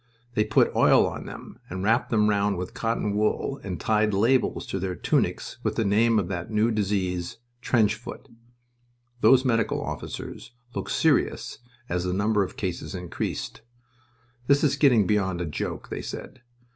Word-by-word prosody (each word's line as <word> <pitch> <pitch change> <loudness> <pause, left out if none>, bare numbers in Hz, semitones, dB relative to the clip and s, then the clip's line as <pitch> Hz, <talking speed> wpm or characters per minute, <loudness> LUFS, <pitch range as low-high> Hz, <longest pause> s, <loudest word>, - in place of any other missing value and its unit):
They 105 - +2
put 110 - +2
oil - - +5
on - - -5
them, - - -10
and 95 +1 -4
wrapped 115 +4 +2
them 105 -2 +3
round 100 -1 +1
with 90 +5 -5
cotton 115 -3 -1
wool, 105 +6 0
and 90 -5 -5
tied 105 +1 +1
labels 120 +6 +2
to 95 - -3
their 90 0 -3
tunics - - -1
with - - -1
the 110 - 0
name 110 +3 +3
of 100 -5 +1
that 90 -1 -4
new 110 +1 +2
disease 95 -4 -1 0.2
"trench 115 -4 +3
foot." - - -9 0.9
Those 130 +2 +5
medical 115 -3 +1
officers - - -6 0.2
looked - - -4
serious - - +1 0.3
as 90 0 -1
the 90 0 -1
number 100 +1 +2
of 95 - -7
cases 95 0 -4
increased. 90 -1 -4 0.9
"This 140 +2 +4
is 140 -2 +3
getting 130 -8 +4
beyond 95 -3 0
a 90 - -2
joke," 75 - -5
they - - -4
said. 130 - -8
105 Hz, 165 wpm, -26 LUFS, 95-115 Hz, 0.9 s, oil